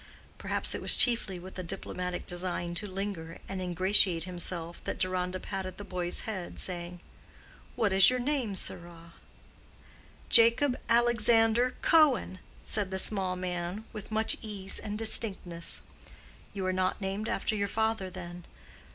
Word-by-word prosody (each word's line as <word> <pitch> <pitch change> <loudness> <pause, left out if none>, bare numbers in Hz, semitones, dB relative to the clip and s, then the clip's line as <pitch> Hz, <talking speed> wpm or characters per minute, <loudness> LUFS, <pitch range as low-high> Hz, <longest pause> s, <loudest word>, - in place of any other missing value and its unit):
Perhaps - - +2
it - - -4
was - - +5
chiefly 230 -6 +4
with 185 +2 -10
a - - -2
diplomatic 180 +1 -5
design 175 -1 -3
to 190 +5 -3
linger 185 -4 -5
and 190 -1 -5
ingratiate 180 -1 +3
himself 175 -1 -2
that - - -4
Deronda 185 0 -2
patted 190 -2 -6
the 205 - -8
boy's 180 -2 -2
head, 190 -6 -6
saying, 175 -1 -5 0.7
"What 220 -5 0
is 195 0 +8
your 255 - 0
name, 250 -5 -2
sirrah?" 170 -2 -3 1.1
"Jacob 235 +4 +5
Alexander 235 0 +3
Cohen," 290 - +3 0.2
said 205 -3 +1
the 190 - -4
small 190 -2 +1
man, 180 +3 -5
with 215 -1 -9
much 220 0 +2
ease 200 -3 -4
and 210 -1 -5
distinctness. 195 -6 +1 0.7
"You 195 -2 -5
are 185 - 0
not 185 0 -1
named 200 +2 -4
after 220 - -1
your 200 -1 -1
father, 220 -3 -1
then?" 175 -1 -9
190 Hz, 145 wpm, -29 LUFS, 180-220 Hz, 1.1 s, is